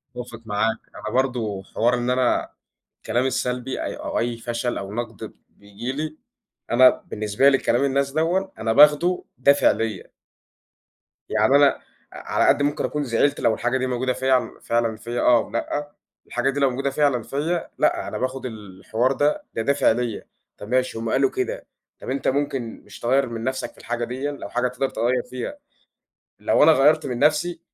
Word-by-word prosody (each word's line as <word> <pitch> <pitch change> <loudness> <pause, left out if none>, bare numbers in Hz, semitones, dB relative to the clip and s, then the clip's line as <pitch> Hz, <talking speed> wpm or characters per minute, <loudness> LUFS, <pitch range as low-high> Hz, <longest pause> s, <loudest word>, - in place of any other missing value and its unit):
أتفق 120 -2 -8
معاك، 110 +1 0 0.2
أنا 105 - -6
برضه 120 -7 -1
حوار 115 +5 0
إن 120 0 -2
أنا 125 -1 +1 0.5
الكلام 120 +2 -1
السلبي 125 0 -2
أي - - -4
أو - - -3
أي 120 0 -1
فشل 120 +1 -3
أو 100 +1 -6
نقد 120 +1 -6 0.2
بييجي 100 +5 -7
لي، 155 +3 -4 0.5
أنا 130 +2 +8 0.2
بالنسبة 105 +5 +2
لي 135 - +4
كلام 120 +1 +1
الناس 140 0 +1
دوًا 170 +6 +1
أنا 110 0 +1
باخده 150 +7 +5
دافع 140 +3 +5
ليّا. 110 -4 -4 1.2
يعني 110 +5 +3
أنا، 145 0 +7 0.5
ع - - -8
على - - +3
قد - - +4
ممكن 145 +1 0
أكون 150 0 -2
زعِلت 130 +2 +1
لو 110 - +2
الحاجة 120 +3 0
دي 130 0 -1
موجودة 130 +1 -1
في 130 -1 +1
فعلًا 115 -1 0
فيَّ 120 +2 -4
آه، 120 0 +5
أو - - -2
لأ، 145 +5 -3 0.4
الحاجة 125 +2 0
دي 140 +1 -2
لو 140 -1 +4
موجودة 135 +2 -2
فعلًا 135 -4 +1
فيَّ، 160 +7 -2
لأ، - - +1
أنا - - -4
باخد 130 +1 -3
الحوار 110 +2 -2
ده 145 +2 +1
ده - - -2
دافِع 140 +5 +3
ليَّ، 120 -1 -2 0.3
طَب 105 - -9
ماشي 130 -1 0
هُم 115 0 -3
قالوا 390 - +3
كده، 425 +7 -3 0.3
طَب - - -8
أنت 135 +1 -2
ممكن 135 -4 -2
مش - - -12
تغيّر 130 +2 +1
من 115 -1 -5
نَفْسك 130 +2 -3
في - - -28
الحاجة 120 0 -4
ديًا، 130 +4 -3
لو 140 -8 -8
حاجة 125 +3 0
تقدَر 125 +2 -2
تغيّر 120 +3 0
فيها، 130 - -5 0.8
لو - - +3
أنا 160 - +8
غيّرت 155 +2 +4
من 125 -3 -3
نَفْسي، 155 +4 +2
130 Hz, 180 wpm, -23 LUFS, 115-140 Hz, 1.2 s, أنا